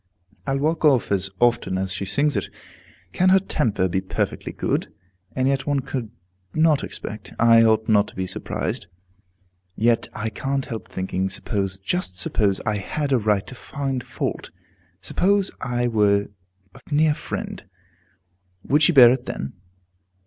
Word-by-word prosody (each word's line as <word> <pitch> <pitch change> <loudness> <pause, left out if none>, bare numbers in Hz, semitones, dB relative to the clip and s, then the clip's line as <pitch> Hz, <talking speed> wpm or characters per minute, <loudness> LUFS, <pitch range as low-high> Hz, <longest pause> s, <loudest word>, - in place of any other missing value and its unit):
I'll 135 0 +1
walk 155 +4 0
off 135 -8 +3
as 95 -1 +1
often 120 -6 +2
as 95 0 -2
she 100 +1 -3
sings 145 +8 +1
it. - - -2 0.6
Can 185 - +3
her 190 - +7
temper 130 - 0
be 95 +1 -1
perfectly 95 - -3
good? - - -2 0.4
And 130 0 +1
yet, 135 0 0
one 145 -1 +1
could 125 -3 -4 0.5
not 155 -2 +3
expect 105 0 -6
I 115 0 +6
ought 110 -1 +3
not 105 -2 +4
to - - -13
be 95 - -2
surprised. 90 -1 -4 0.9
Yet 115 +1 +2
I 110 +1 -3
can't 135 +4 -2
help 115 -2 -6
thinking, 95 0 -2
suppose 95 -1 -2
just 95 - -2
suppose 100 +1 +1
I 110 -2 -1
had 140 +8 -3
a 130 - +4
right 105 -2 +1
to - - -9
find 135 0 -4
fault, - - -4 0.5
suppose 200 - +2
I 120 -2 0
were 100 -3 +2 0.4
a - - -14
near 150 +1 +4
friend, 150 - -6 1.0
would 150 +2 +2
she 165 +3 +5
bear 125 -5 +9
it 130 -1 -4
then? 70 - -5
120 Hz, 155 wpm, -23 LUFS, 100-140 Hz, 1.0 s, bear